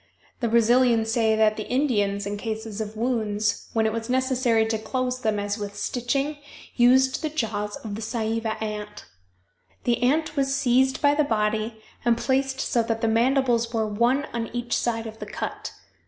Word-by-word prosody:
The 235 - 0
Brazilians 230 0 +3
say 225 -1 +2
that 215 -1 +3
the 215 - -5
Indians, 205 -7 +1
in 205 0 -3
cases 220 0 -5
of 215 0 -6
wounds, 215 -3 -1
when 225 -1 +2
it 220 - +1
was 230 +1 -4
necessary 255 -3 +2
to 220 -1 -1
close 255 +3 -2
them 220 -3 0
as 205 +1 -2
with 205 -1 -5
stitching, 275 +4 -1 0.4
used 260 +2 +4
the 310 - -1
jaws 210 -8 -2
of 215 -3 -7
the 215 - -5
Saiiva 225 0 -2
ant. 210 -1 -5 0.8
The 240 -1 +1
ant 300 +5 +1
was 275 -1 +1
seized 265 +1 +2
by 285 0 +5
the 300 +1 +2
body 220 -2 -1 0.2
and 235 -1 +3
placed 265 +1 0
so 240 - +1
that 225 0 -2
the 225 - +2
mandibles 235 0 +2
were 220 -1 +1
one 235 +7 +1
on 230 -1 -2
each 240 0 -1
side 230 -1 -1
of 220 0 -8
the - - -6
cut. - - -5
230 Hz, 180 wpm, -25 LUFS, 220-255 Hz, 0.8 s, by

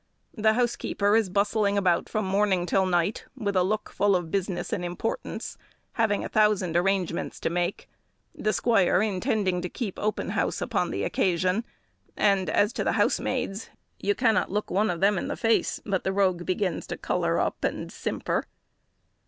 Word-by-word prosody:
The 220 -1 +3
housekeeper 220 -3 +1
is 220 -4 +2
bustling 200 +1 +1
about 180 -4 +2
from 215 -2 -1
morning 190 -2 +2
till 190 +1 +2
night, 175 +3 0
with 200 -5 -2
a 185 - +4
look 210 +4 -1
full 200 -1 +2
of 175 -3 -2
business 190 0 -2
and 190 -5 -2
importance, 175 - -4 0.3
having 220 -3 0
a - - -2
thousand 210 -6 +2
arrangements 180 -1 0
to - - -1
make, 175 +2 -2 0.5
the 215 - -1
squire 200 -5 +3
intending 190 -2 0
to 180 - -4
keep 210 -3 -5
open 215 0 -1
house - - -1
on - - 0
the - - -2
occasion; 185 +4 +1 0.5
and 195 -4 +2
as 205 +7 +2
to - - -2
the - - +1
housemaids, 200 +3 0 0.3
you 205 0 0
cannot 230 -4 +2
look 210 +2 -2
one 205 +4 +2
of 170 -2 -3
them 200 -1 +3
in - - -4
the - - -3
face, 225 -1 +1
but 195 -3 -1
the 190 - 0
rogue 185 -3 +1
begins 185 0 -1
to - - -5
colour - - 0
up - - -2
and - - -2
simper. - - -2
195 Hz, 175 wpm, -26 LUFS, 180-215 Hz, 0.5 s, a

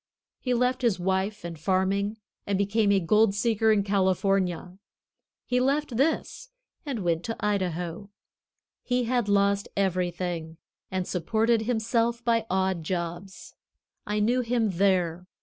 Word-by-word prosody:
He 250 -2 0
left 250 +2 +1
his 230 -7 +1
wife 190 +2 -1
and 170 -2 -6
farming 195 +4 0 0.3
and 200 -1 +1
became 200 +1 +2
a 200 - +4
gold 210 +3 +3
seeker 220 0 +2
in 205 -2 +3
California. 190 -2 0 0.7
He 250 0 +1
left 275 0 0
this 320 - -1 0.4
and 240 -8 -3
went 170 -1 0
to 225 - -3
Idaho. 185 -2 -2 0.7
He 250 0 0
had 240 -2 0
lost 200 0 +2
everything, 175 -3 -1 0.3
and 185 -1 -2
supported 220 +6 +1
himself 235 0 0
by 230 -1 +1
odd 190 -2 0
jobs. 175 +2 -5 0.5
I 210 0 0
knew 240 +4 +2
him 230 -3 0
there. 180 -2 +1
200 Hz, 130 wpm, -27 LUFS, 185-230 Hz, 0.7 s, a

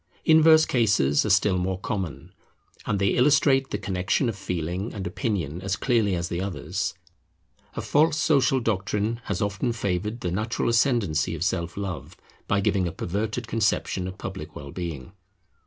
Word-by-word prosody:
Inverse 160 0 +7
cases 100 - +2
are - - -1
still 95 -2 +3
more 90 +1 -1
common; 95 -4 -5 0.5
and 105 - +1
they 100 0 +2
illustrate 135 0 +3
the - - -2
connexion 95 +5 0
of 110 - -3
feeling 90 +1 -3
and 100 -2 -5
opinion 90 -4 -2
as 95 +1 -1
clearly 115 -7 +1
as 85 0 -2
the 85 0 -3
others. 95 -1 -3 0.8
A - - -3
false 155 +2 +2
social 145 -3 +3
doctrine 105 +1 -1
has 100 -1 -1
often 100 +4 -1
favoured 105 +2 -2
the 90 - -2
natural 110 +7 -1
ascendency 115 - +1
of 80 - -3
Self 90 -2 -2
love 100 -2 -5 0.3
by 100 0 +2
giving 95 -2 +1
a - - -3
perverted 110 +8 -3
conception 110 -4 0
of 95 0 -7
public - - -7
well 70 -1 -8
being. 85 -6 -6
100 Hz, 160 wpm, -25 LUFS, 90-115 Hz, 0.8 s, Inverse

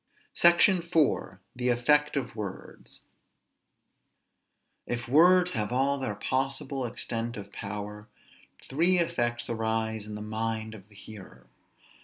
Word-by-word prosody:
SECTION 175 +2 +5
IV. 165 -3 0 0.2
THE 125 0 0
EFFECT 145 +5 +2
OF 125 -5 -3
WORDS. 105 -4 -8 1.9
If 120 0 -4
words 180 +6 +5
have 105 -1 -2
all 135 +3 +1
their 130 -6 -3
possible 135 +3 -2
extent 115 0 -4
of 100 -1 -9
power, 105 +1 -6 0.6
three 170 +7 +2
effects 120 -8 -1
arise 110 -1 -2
in 105 - -7
the 105 - -6
mind 110 0 -3
of 100 -1 -13
the 105 - -19
hearer. 100 -1 -12
120 Hz, 120 wpm, -28 LUFS, 110-140 Hz, 1.9 s, SECTION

